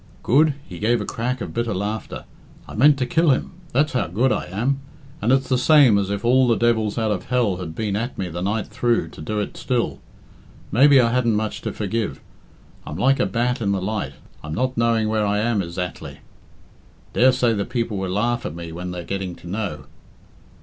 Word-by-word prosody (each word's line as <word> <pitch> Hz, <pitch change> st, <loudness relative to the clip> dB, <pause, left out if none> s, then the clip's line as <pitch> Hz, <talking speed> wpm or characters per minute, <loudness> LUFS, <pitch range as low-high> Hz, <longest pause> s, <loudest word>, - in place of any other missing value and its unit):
"Good?" 150 Hz, +3 st, +4 dB
He 90 Hz, -, -9 dB
gave 115 Hz, +2 st, +2 dB
a 105 Hz, -, -3 dB
crack 125 Hz, +4 st, -3 dB
of -, -, -5 dB
bitter 115 Hz, -3 st, -1 dB
laughter. 105 Hz, +3 st, -4 dB, 0.4 s
"I -, -, -9 dB
meant 145 Hz, +5 st, +5 dB
to 130 Hz, -, 0 dB
kill 165 Hz, +6 st, +2 dB
him 130 Hz, -, +1 dB, 0.2 s
that's 145 Hz, +4 st, +1 dB
how 125 Hz, -, 0 dB
good 120 Hz, +9 st, +1 dB
I -, -, -1 dB
am. 120 Hz, +9 st, -1 dB, 0.4 s
And 115 Hz, -, +2 dB
it's 135 Hz, 0 st, +2 dB
the 130 Hz, -1 st, +1 dB
same 130 Hz, -7 st, +6 dB
as 100 Hz, -1 st, -2 dB
if 100 Hz, +3 st, -3 dB
all 130 Hz, +1 st, +4 dB
the 115 Hz, -, +4 dB
devils 110 Hz, -2 st, +1 dB
out 110 Hz, -2 st, +1 dB
of 95 Hz, -4 st, -2 dB
hell 120 Hz, -7 st, +1 dB
had 85 Hz, -3 st, -6 dB
been 105 Hz, -3 st, -2 dB
at 115 Hz, +5 st, -3 dB
me 95 Hz, -, -2 dB
the 85 Hz, +1 st, -5 dB
night 105 Hz, +2 st, -1 dB
through 120 Hz, -1 st, 0 dB
to -, -, -12 dB
do 105 Hz, +7 st, -2 dB
it 105 Hz, -, -4 dB
still. 125 Hz, -3 st, -1 dB, 0.7 s
Maybe 135 Hz, +5 st, +6 dB
I 115 Hz, -2 st, +3 dB
hadn't 120 Hz, -3 st, +2 dB
much 110 Hz, 0 st, -2 dB
to -, -, -3 dB
forgive. 110 Hz, +1 st, -3 dB, 0.6 s
I'm 75 Hz, -, -7 dB
like 135 Hz, +7 st, +3 dB
a -, -, +2 dB
bat 120 Hz, +5 st, -1 dB
in 100 Hz, -2 st, +1 dB
the 95 Hz, -, 0 dB
light 105 Hz, +3 st, -3 dB, 0.3 s
I'm 75 Hz, 0 st, -5 dB
not 130 Hz, +2 st, -1 dB
knowing 115 Hz, -1 st, +2 dB
where 110 Hz, 0 st, +1 dB
I 105 Hz, 0 st, +1 dB
am 110 Hz, -1 st, +1 dB
ezactly. 90 Hz, 0 st, -5 dB, 1.0 s
Daresay 125 Hz, -1 st, +4 dB
the 100 Hz, -2 st, -1 dB
people 115 Hz, -2 st, -2 dB
will 95 Hz, -1 st, -2 dB
laugh 115 Hz, +5 st, 0 dB
at 75 Hz, -, -5 dB
me 85 Hz, -1 st, -7 dB
when 90 Hz, +2 st, -6 dB
they're 90 Hz, -1 st, -5 dB
getting 95 Hz, 0 st, -4 dB
to -, -, -13 dB
know. 90 Hz, -7 st, -4 dB
110 Hz, 210 wpm, -22 LUFS, 100-125 Hz, 1.0 s, same